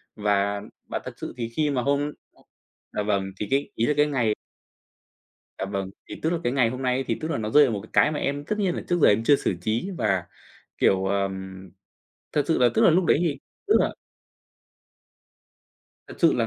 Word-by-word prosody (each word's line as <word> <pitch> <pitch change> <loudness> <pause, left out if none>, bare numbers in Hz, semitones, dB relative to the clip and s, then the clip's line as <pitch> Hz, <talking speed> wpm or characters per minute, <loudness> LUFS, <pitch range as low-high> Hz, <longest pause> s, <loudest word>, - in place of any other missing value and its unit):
Và 100 -1 +1 0.3
bà - - -2
thật - - -6
sự - - -6
thì 115 -1 -3
khi 150 -1 +1
mà 130 -3 0
hôm 140 +2 0 0.8
à, 105 - -2
vâng, 100 -2 +1 0.2
thì 105 - -2
cái 140 +1 +1
ý 115 - +1
là 150 - +2
cái 150 - +5
ngày 125 -7 +1 1.3
Dạ - - -2
vâng. 95 -1 -3 0.2
Thì - - -8
tức 160 - +1
là 170 - 0
cái 120 - +1
ngày 125 -4 +3
hôm 130 +1 -5
nay 130 +1 +1
thì, - - -1
tức 155 - -3
là, 165 - -1
nó 110 -1 -3
rơi 150 +5 +7
vào 130 - +1
một 100 - -2
cái 110 - -14
cái 150 - +5
mà 150 - -3
em 145 +1 -2
tất 210 +6 -2
nhiên 190 -4 +1
là - - -4
trước 175 0 +2
giờ - - +8
em 110 +2 +3
chưa 145 - +6
xử 95 - -1
trí, 110 - -1
và, 95 -4 +1 0.5
kiểu, 95 0 +3
ờm, 95 -1 -3 0.6
thật 145 - +2
sự 160 - +3
là, 125 -1 +5
tức - - +3
là, - - +7
lúc 180 +3 +3
đấy - - +4
thì, 160 -5 0 0.3
tức 420 - +3
là - - 0 2.1
Thật - - -9
sự - - +6
là - - +1
120 Hz, 220 wpm, -25 LUFS, 100-150 Hz, 2.1 s, giờ